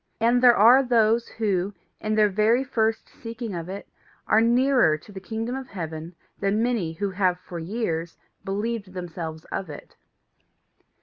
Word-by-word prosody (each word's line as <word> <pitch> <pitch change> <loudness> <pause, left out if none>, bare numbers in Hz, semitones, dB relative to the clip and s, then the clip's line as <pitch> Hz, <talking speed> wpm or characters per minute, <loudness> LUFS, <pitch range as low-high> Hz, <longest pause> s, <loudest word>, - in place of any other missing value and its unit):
And 235 +2 +3
there 245 -2 +7
are 240 +6 +7
those 230 -2 +2
who, 200 -3 -1 0.2
in 215 0 -1
their 215 -1 +5
very 215 +5 +2
first 225 -4 -1
seeking 230 -2 -7
of 170 0 -5
it, 200 +1 -7 0.4
are 220 - +4
nearer 240 - +3
to 180 - -16
the 195 - -8
kingdom 225 +5 -4
of 265 -1 -6
heaven 165 -2 -6 0.2
than 200 +3 +1
many 225 -10 -1
who 195 +4 -3
have 185 -2 +1
for 175 -1 -8
years 170 -3 -3 0.3
believed 205 0 -3
themselves 165 -3 -6
of 190 - -4
it. 145 - -11
210 Hz, 160 wpm, -25 LUFS, 180-230 Hz, 0.4 s, there